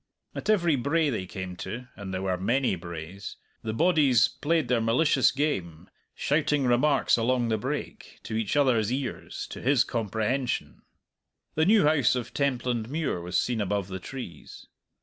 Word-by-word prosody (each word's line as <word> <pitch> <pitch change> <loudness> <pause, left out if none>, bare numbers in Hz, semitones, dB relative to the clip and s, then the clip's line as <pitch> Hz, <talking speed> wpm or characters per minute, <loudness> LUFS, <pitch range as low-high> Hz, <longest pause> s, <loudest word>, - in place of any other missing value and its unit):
At - - -5
every 175 -7 +3
brae 145 +4 +1
they 95 -6 -3
came 95 -1 -6
to 125 +6 -6
(and 100 -3 -7
there 95 0 -3
were 95 -1 0
many 120 +7 +1
braes) 85 +2 -8 0.3
the 110 - -3
bodies 145 -3 +4
played 160 -2 0
their 120 -2 +2
malicious 130 +3 +3
game, 95 - -3 0.2
shouting 150 -1 +1
remarks 130 +3 +3
along 120 0 +1
the 110 - +1
brake, - - -5
to 110 - -5
each 110 +1 -1
other's 120 -6 +3
ears, 130 -1 -4
to - - -7
his 130 -2 +4
comprehension. 110 - -2 0.7
The 155 +2 +2
new 215 -2 +5
house 150 -5 +3
of 125 -2 -4
Templandmuir 125 - -1
was 85 0 0
seen 120 -3 -1
above 100 -1 -1
the 95 0 -5
trees. 90 - -9
120 Hz, 155 wpm, -27 LUFS, 100-140 Hz, 0.7 s, new